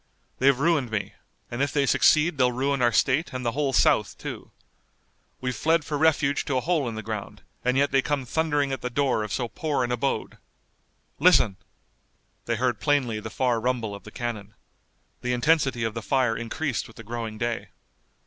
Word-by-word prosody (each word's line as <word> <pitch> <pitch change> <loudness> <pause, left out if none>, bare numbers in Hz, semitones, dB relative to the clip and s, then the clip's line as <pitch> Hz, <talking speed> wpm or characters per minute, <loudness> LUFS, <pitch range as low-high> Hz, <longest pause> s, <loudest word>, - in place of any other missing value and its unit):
"They've 135 0 +4
ruined 150 -5 +2
me, 105 -2 -3 0.4
and 120 +2 -3
if 140 -1 +1
they 140 -1 +2
succeed 150 +3 +3
they'll 125 -1 +4
ruin 135 +2 0
our 120 -1 +4
state 135 +7 +1
and 130 -1 -4
the 115 - +1
whole 140 +1 0
South, - - +2
too. - - -7 0.9
We've 125 -1 -3
fled 160 -1 +2
for 150 - -3
refuge 145 -2 +2
to 135 - 0
a - - +1
hole 155 -4 0
in 115 - -6
the 110 - -5
ground, 110 -2 -6 0.2
and 125 +1 +1
yet 140 +1 +2
they 135 0 +4
come 140 -1 -2
thundering 145 0 0
at 135 - -3
the 125 - -3
door 130 -2 +1
of 105 -1 -4
so 120 +1 -1
poor 150 0 -1
an 120 - -2
abode. 125 +3 -2 0.8
Listen!" 100 - +5 0.9
They 115 - 0
heard 120 -2 0
plainly 130 -7 +1
the 110 - -7
far 120 -1 0
rumble 120 -3 -1
of 100 - -9
the - - -10
cannon. 110 -3 -5 0.7
The 125 0 -1
intensity 135 -2 +2
of 115 -1 -1
the 115 - -4
fire 125 -2 +1
increased 120 +3 -3
with 115 - -16
the 115 - -9
growing 115 -1 -5
day. 120 0 -2
125 Hz, 195 wpm, -25 LUFS, 115-140 Hz, 0.9 s, Listen